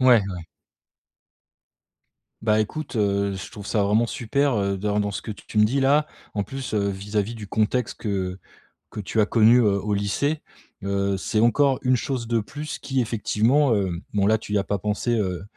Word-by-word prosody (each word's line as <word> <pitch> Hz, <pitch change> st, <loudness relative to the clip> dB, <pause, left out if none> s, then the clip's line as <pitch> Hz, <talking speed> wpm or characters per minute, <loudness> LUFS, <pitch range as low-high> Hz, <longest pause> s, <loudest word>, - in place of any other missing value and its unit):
Ouais, 125 Hz, -3 st, +6 dB
ouais. 90 Hz, -3 st, -7 dB, 2.0 s
Bah, 110 Hz, -1 st, +3 dB
écoute 155 Hz, +5 st, -4 dB
heu, 100 Hz, -1 st, +1 dB
je 95 Hz, -, -7 dB
trouve 100 Hz, -1 st, -9 dB
ça 105 Hz, -, +1 dB
vraiment 105 Hz, +4 st, +3 dB
super, 135 Hz, +4 st, 0 dB
heu, 100 Hz, -1 st, 0 dB
dans 105 Hz, +2 st, 0 dB
dans 105 Hz, 0 st, -1 dB
ce -, -, -5 dB
que 110 Hz, -, -6 dB
tu 105 Hz, -, -10 dB
me 105 Hz, -, +7 dB
dis 135 Hz, +6 st, +1 dB
là 145 Hz, +3 st, +3 dB, 0.3 s
en 100 Hz, -, 0 dB
plus, 130 Hz, +2 st, -6 dB
heu, 100 Hz, -1 st, +1 dB
vis-à-vis 105 Hz, +3 st, -2 dB
du 110 Hz, -2 st, -8 dB
contexte 110 Hz, +4 st, 0 dB
que 95 Hz, -3 st, -2 dB, 0.5 s
que -, -, -7 dB
tu 105 Hz, +3 st, -2 dB
as 105 Hz, -, +5 dB
connu, 115 Hz, +2 st, +5 dB
heu, 100 Hz, -4 st, +2 dB
au 105 Hz, 0 st, -1 dB
lycée, 140 Hz, +10 st, 0 dB, 0.4 s
heu, 100 Hz, 0 st, 0 dB
c'est 105 Hz, +3 st, -1 dB
encore 135 Hz, +3 st, +3 dB
une 125 Hz, -1 st, +3 dB
chose 125 Hz, -1 st, -3 dB
de 115 Hz, 0 st, +1 dB
plus 145 Hz, +7 st, -6 dB
qui 135 Hz, -2 st, -1 dB
effectivement, 115 Hz, +4 st, +2 dB
heu, 100 Hz, -2 st, 0 dB, 0.2 s
bon, 100 Hz, -1 st, +2 dB
là, 110 Hz, +2 st, +4 dB
tu 105 Hz, -1 st, -7 dB
y -, -, +3 dB
as 100 Hz, -, +1 dB
pas 100 Hz, +1 st, -1 dB
pensé, 105 Hz, +4 st, -1 dB
heu, 95 Hz, -3 st, -2 dB
105 Hz, 195 wpm, -24 LUFS, 100-120 Hz, 2.0 s, me